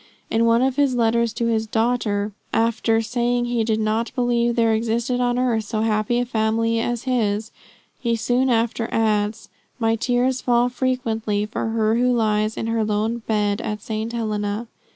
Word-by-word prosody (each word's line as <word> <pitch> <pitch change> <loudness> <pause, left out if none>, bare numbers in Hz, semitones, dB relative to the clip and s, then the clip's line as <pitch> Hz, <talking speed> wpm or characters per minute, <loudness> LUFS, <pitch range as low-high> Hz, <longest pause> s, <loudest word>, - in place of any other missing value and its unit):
In 230 +1 +3
one 230 +2 +4
of 265 0 0
his 280 -3 +2
letters 235 0 +2
to 235 - -2
his 220 -1 0
daughter, 220 -2 0 0.2
after 225 0 +1
saying 240 +1 0
he 240 -1 0
did 220 -1 0
not 220 +2 0
believe 240 -2 +1
there 230 -1 +3
existed 235 +3 0
on 245 0 +1
earth 235 -4 +1
so 215 0 -2
happy 215 +1 +1
a 245 - +1
family 230 0 0
as 240 0 -2
his, 220 -4 0 0.5
he 235 -2 0
soon 245 +3 +1
after 230 -1 0
adds: 215 0 0 0.3
'My 225 -2 +1
tears 250 +2 0
fall 245 0 +2
frequently 225 -5 -1
for 215 +1 -3
her 225 0 +1
who 250 +1 +2
lies 215 -2 +1
in - - -2
her 225 -1 0
lone 215 +2 -1
bed 205 -2 0
at 210 0 -4
St. 220 -1 -3
Helena.' 215 -1 -2
230 Hz, 175 wpm, -22 LUFS, 220-240 Hz, 0.5 s, one